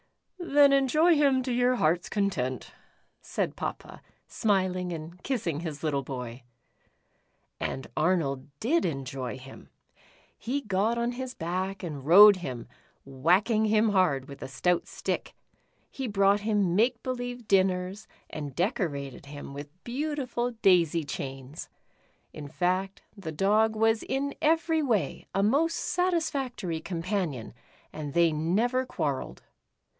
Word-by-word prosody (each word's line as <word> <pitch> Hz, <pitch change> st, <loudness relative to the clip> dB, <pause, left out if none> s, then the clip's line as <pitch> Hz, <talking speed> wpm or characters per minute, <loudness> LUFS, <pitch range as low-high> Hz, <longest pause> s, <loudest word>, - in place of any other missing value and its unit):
"Then 290 Hz, -5 st, +5 dB
enjoy 305 Hz, +5 st, +4 dB
him 275 Hz, -3 st, +3 dB
to 250 Hz, -1 st, -2 dB
your 245 Hz, +1 st, +3 dB
heart's 170 Hz, -3 st, +1 dB
content," 185 Hz, -, -2 dB, 0.5 s
said -, -, -3 dB
Papa, -, -, -6 dB, 0.3 s
smiling 185 Hz, -4 st, 0 dB
and 170 Hz, +2 st, -7 dB
kissing 180 Hz, -, -2 dB
his 160 Hz, -3 st, -6 dB
little 145 Hz, -3 st, 0 dB
boy. 125 Hz, -2 st, -6 dB, 1.2 s
And 135 Hz, -, -3 dB
Arnold 155 Hz, -5 st, 0 dB
did 320 Hz, +9 st, +2 dB
enjoy 135 Hz, -4 st, -3 dB
him. 130 Hz, +1 st, -13 dB, 0.7 s
He 255 Hz, +5 st, -2 dB
got 215 Hz, +1 st, 0 dB
on 235 Hz, +1 st, 0 dB
his 255 Hz, 0 st, -6 dB
back 185 Hz, +4 st, -3 dB
and 150 Hz, -6 st, -5 dB
rode 200 Hz, +5 st, +9 dB
him, 125 Hz, -9 st, -6 dB, 0.4 s
whacking 180 Hz, -, +2 dB
him 215 Hz, +1 st, +3 dB
hard 170 Hz, -10 st, +2 dB
with 140 Hz, -, -11 dB
a -, -, -5 dB
stout 170 Hz, +7 st, 0 dB
stick. -, -, -4 dB, 0.6 s
He 265 Hz, -3 st, -4 dB
brouo^ht 200 Hz, 0 st, +3 dB
him 205 Hz, -4 st, +1 dB
make 235 Hz, +3 st, +2 dB
believe 245 Hz, -2 st, -4 dB
dinners, 190 Hz, 0 st, +1 dB, 0.2 s
and 145 Hz, -4 st, -6 dB
decorated 145 Hz, -, -2 dB
him 145 Hz, -1 st, -8 dB
with 145 Hz, +1 st, -7 dB
beautiful 255 Hz, -2 st, -2 dB
daisy 170 Hz, -4 st, +4 dB
chains. 135 Hz, 0 st, -6 dB, 0.6 s
In 150 Hz, -2 st, -8 dB
fact, 185 Hz, +5 st, -1 dB
the 190 Hz, -6 st, -6 dB
Dog 210 Hz, +7 st, +2 dB
was 225 Hz, 0 st, +2 dB
in 280 Hz, +1 st, -2 dB
every 320 Hz, +1 st, +2 dB
way 235 Hz, -9 st, -1 dB
a 195 Hz, -, +2 dB
most 305 Hz, +10 st, +2 dB
satisfactory 275 Hz, -, -1 dB
companion, 170 Hz, -, -3 dB, 0.4 s
and 150 Hz, -2 st, -6 dB
they 170 Hz, -1 st, +4 dB
never 215 Hz, +12 st, +1 dB
quarrelled. 145 Hz, -, -3 dB
190 Hz, 130 wpm, -28 LUFS, 155-240 Hz, 1.2 s, rode